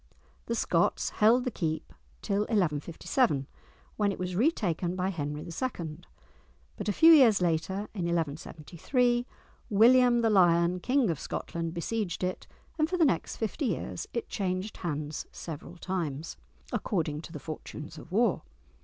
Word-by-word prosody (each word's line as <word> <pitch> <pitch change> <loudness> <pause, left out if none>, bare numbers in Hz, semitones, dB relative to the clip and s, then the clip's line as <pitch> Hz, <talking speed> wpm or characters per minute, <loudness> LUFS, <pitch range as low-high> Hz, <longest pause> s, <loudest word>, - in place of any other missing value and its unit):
The 235 - -1
Scots - - +1
held 235 +4 +6
the 250 - -2
keep 160 -6 -3 0.3
till 200 - 0
1157, 170 - +1 0.5
when 205 -1 +2
it - - -5
was 180 0 -3
retaken 185 - +1
by 185 +1 0
Henry 150 -4 -4
II., 170 -5 -4 0.8
but - - -3
a - - +4
few 325 +9 +7
years 245 -9 +7
later, 175 +3 0
in 185 -5 -3
1173, 170 - -1 0.4
William 240 +3 +6
the 225 -1 +3
Lion, 175 -2 +4
King 250 -1 +2
of 155 - -4
Scotland, 165 -1 -4
besieged 190 +1 -2
it, 180 0 -3 0.3
and 310 +1 +2
for 365 - 0
the 335 - +5
next 175 - 0
fifty 230 +7 -2
years 170 -4 -3
it 235 - -3
changed 190 0 -3
hands 150 -2 -4
several 165 +2 -8
times, 165 -5 -3 0.4
according 155 -7 -1
to 165 - -11
the - - -6
fortunes 155 +1 -8
of 165 - -13
war. 230 +6 +2
180 Hz, 145 wpm, -29 LUFS, 165-230 Hz, 0.8 s, few